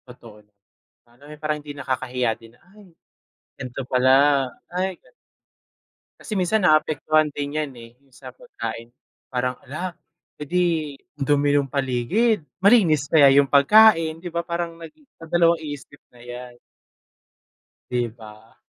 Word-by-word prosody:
Totoo. 115 -4 -14 0.7
Ano, 120 +4 -23
eh, 150 - -10
parang 150 -1 -2
hindi 145 0 -9
nakakahiya 125 -3 -2
din 115 0 -17
na, - - -29
"Ay, 210 -2 -17 0.7
gan'to 130 0 -6
pala, 135 +2 +3 0.2
ay, 185 +1 -2
gan" - - -26 1.1
Kasi - - -7
minsan, 195 +2 +1
naaapektuhan 155 -1 +2
din 145 +1 -5
yan, 155 -2 -2
eh. 115 0 -12
Yung 135 - -30
sa - - -11
pagkain 400 - -8 0.4
parang, 125 0 -1
"Hala, 170 +6 -6 0.5
eh - - -2
di 180 +5 0 0.5
ang 145 - -4
dumi 145 0 +2
ng 140 -1 +1
paligid, 140 - 0 0.2
malinis 185 - +4
kaya 145 -3 +6
yung 140 -1 +5
pagkain? 165 +2 +5
'Di 175 - -8
ba 170 0 -1
parang 170 0 -4
nagdadalawang-isip, 165 - -2 0.2
ayan. 120 0 -11 1.3
'Di 120 -1 0
ba? 110 -1 -15
145 Hz, 130 wpm, -22 LUFS, 125-170 Hz, 1.3 s, kaya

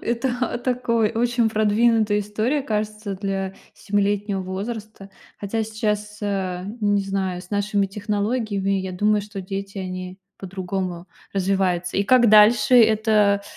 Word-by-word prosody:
Это, 235 +3 -1
а, 250 - -1
такой 235 -3 0
очень 235 0 +1
продвинутая 215 0 +2
история, 220 +8 -1
кажется, 210 -3 -3
для 195 -1 -3 0.2
семилетнего 205 0 -1
возраста. 200 +2 -6 0.3
Хотя 220 +2 -2
сейчас, 210 -1 -3
а, 190 -3 -2 0.2
не 205 -1 +2
знаю, 190 -2 -2
с 180 - -16
нашими 205 -1 +1
технологиями, 205 0 -2
я 190 -1 -5
думаю, 210 +3 +2
что 205 -1 -7
дети, 195 +1 -6
они 185 0 -6 0.2
по-другому 185 -1 -4 0.3
развиваются. 185 -2 0
И 200 - +2
как 245 +1 +5
дальше 215 +2 +6
это 215 -3 +4
205 Hz, 130 wpm, -22 LUFS, 195-220 Hz, 0.3 s, дальше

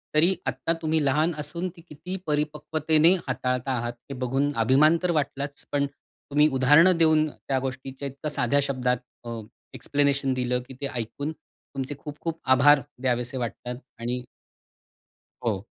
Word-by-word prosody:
तरी 170 +5 +5
आत्ता 165 - -1
तुम्ही 160 -1 +1
लहान 150 +5 +3
असून 170 +5 -1
ती 170 - -14
किती 160 +5 -6
परिपक्वतेने 155 +2 +2
हाताळता 125 0 -1
आहात 120 0 -3 0.2
हे - - -4
बघून 135 +3 +1
अभिमान 150 +8 +5
तर 180 - +2
वाटलाच 140 -2 -2
पण 140 0 +2
तुम्ही 145 +1 -1
उदाहरणं 150 +7 +6
देऊन 155 -1 +4
त्या 135 -2 -3
गोष्टीच्या 135 +1 -5
इतका 140 +3 -5
साध्या 140 -1 +1
शब्दात 125 -2 0 0.3
अ, 115 -1 -4 0.4
एक्सप्लेनेशन 140 +1 +1
दिलं 125 -1 0
की 130 - -10
ते 140 - 0
ऐकून 125 +6 -3
तुमचे 140 -3 -8
खूप 150 -1 -8
खूप 165 -1 -3
आभार 140 +2 +6 0.2
द्यावेसे 125 0 0
वाटतात 120 +1 -4 0.2
आणि 125 +1 -2 1.2
हो. 105 -4 0
140 Hz, 145 wpm, -26 LUFS, 130-155 Hz, 1.2 s, उदाहरणं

